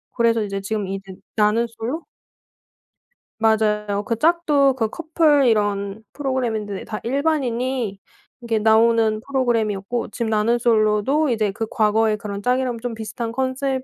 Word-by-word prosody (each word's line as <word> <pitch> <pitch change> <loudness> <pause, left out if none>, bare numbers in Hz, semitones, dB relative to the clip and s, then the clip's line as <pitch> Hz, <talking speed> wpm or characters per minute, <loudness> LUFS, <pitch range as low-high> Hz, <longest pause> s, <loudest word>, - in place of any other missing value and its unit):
그래서 230 -2 +2
이제 195 -1 -4
지금 205 0 -3
이제 195 0 -6 0.2
나는 215 +2 +3
솔로 230 +8 -5 1.3
맞아요. 210 -2 +1
그 230 - -1
짝도 300 -3 +3
그 225 -4 -1
커플 310 -1 +2
이런 205 -1 0
프로그램인데 235 -8 -2
다 215 - -5
일반인이 255 -5 -1 0.4
이렇게 230 -2 0
나오는 220 0 +3
프로그램이었고 235 -4 -1
지금 235 -2 -3
나는 220 +2 +2
솔로도 230 +6 +2
이제 220 -4 +1
그 225 +3 -3
과거의 215 0 +2
그런 200 -1 -6
짝이랑 250 +1 0
좀 240 0 -4
비슷한 225 +1 -5
컨셉 260 +1 -1
225 Hz, 310 characters per minute, -21 LUFS, 210-255 Hz, 1.3 s, 나는